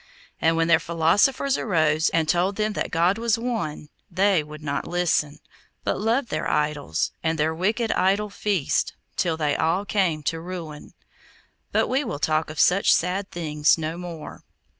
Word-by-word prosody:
And 165 0 +3
when 165 0 +2
their 170 - +5
philosophers 200 +12 +2
arose, 160 -5 +2
and 165 -1 0
told 180 +4 +1
them 215 0 -1
that - - -2
God 175 +5 +2
was 230 -2 +1
One, 225 -11 -4 0.2
they 190 -1 +2
would 150 0 -11
not 145 -1 -3
listen, 165 -4 0 0.5
but - - -1
loved 235 +4 +1
their 155 - -2
idols, 150 - -1
and 160 0 0
their 155 +1 +1
wicked 220 +7 0
idol 200 +3 +1
feasts, 200 -7 0 0.2
till 165 -2 0
they 150 -2 0
all 165 +6 0
came 180 -8 0
to 165 +2 -2
ruin. 165 -4 -8 0.8
But - - +2
we 270 +3 +1
will 225 - -4
talk 155 +1 0
of 155 - -7
such 195 +3 +4
sad 185 +3 +1
things 150 -3 +1
no 160 0 -3
more. 170 -3 -8
170 Hz, 165 wpm, -24 LUFS, 155-200 Hz, 0.8 s, their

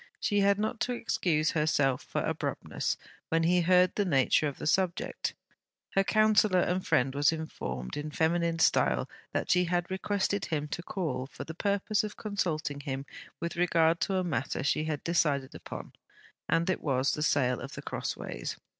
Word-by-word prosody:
She 205 -1 +1
had 200 0 +4
not 220 +2 -2
to 250 - 0
excuse 160 -9 +1
herself 145 -4 +2
for - - -3
abruptness - - -2 0.3
when 165 0 +2
he 175 +2 +4
heard 180 +1 +4
the 205 - +1
nature 150 -3 +3
of 140 - -5
the - - -6
subject. 175 +3 0 0.6
Her 195 - +4
counsellor 215 -3 +4
and 180 +2 0
friend 130 +1 +2
was 145 +2 +3
informed, 65 - -5
in 150 +1 -4
feminine 165 +2 +1
style, 65 - +3 0.2
that - - -1
she 180 0 +4
had, 175 +1 -1
requested 200 +1 0
him 150 -2 -2
to 175 - -4
call, 160 -8 -3
for 140 - -8
the 160 - -7
purpose 205 +4 0
of 210 -1 -6
consulting 165 -9 -2
him 135 -1 -4 0.3
with 170 +1 -3
regard 170 -1 +3
to 195 - 0
a 185 - +1
matter 145 -6 -2
she 155 +2 +1
had 150 -2 -3
decided 145 -6 +1
upon; - - -8 0.6
and 165 +1 +2
it - - -2
was, 135 -2 +1
the 150 - -3
sale 130 -5 +2
of 135 +2 -7
The - - -7
Crossways. - - -4
165 Hz, 175 wpm, -30 LUFS, 145-185 Hz, 0.6 s, had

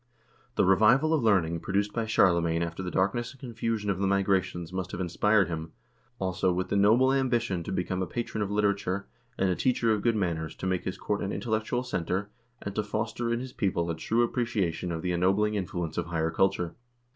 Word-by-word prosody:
The - - +3
revival 110 - +5
of 155 - +2
learning 90 -7 +2
produced 100 +4 -1
by 115 -1 -1
Charlemagne 85 -5 +3
after 85 +2 -4
the 90 - -3
darkness 100 +7 0
and 135 - -20
confusion 115 -4 -3
of 95 - -3
the 100 - +1
Migrations 95 -3 0
must 95 0 -3
have - - -4
inspired 95 +2 +2
him, 80 -1 -5 0.4
also, 95 -2 0
with 90 +1 -2
the - - 0
noble 115 +7 +5
ambition 120 -8 +1
to - - -6
become 95 0 -1
a 95 - -1
patron 110 +3 -3
of 100 - -1
literature, 100 -2 0 0.3
and 95 -1 +2
a - - +1
teacher 115 -1 +2
of 105 - -1
good 115 0 +2
manners, 85 -6 -2
to - - -6
make 95 -1 -1
his 95 - -3
court 105 -1 -2
an 100 - -2
intellectual 115 +2 -1
center, 100 -3 -2 0.3
and 100 - -4
to 105 - 0
foster 110 +3 -2
in 115 - 0
his 130 -1 -7
people 85 -5 0
a - - -3
true 115 +8 +1
appreciation 110 -8 -1
of 80 -1 -4
the 90 - 0
ennobling 95 +4 +2
influence 90 -5 -3
of 85 - -3
higher 80 -1 -1
culture. 90 -3 +1
95 Hz, 205 wpm, -28 LUFS, 90-110 Hz, 0.4 s, revival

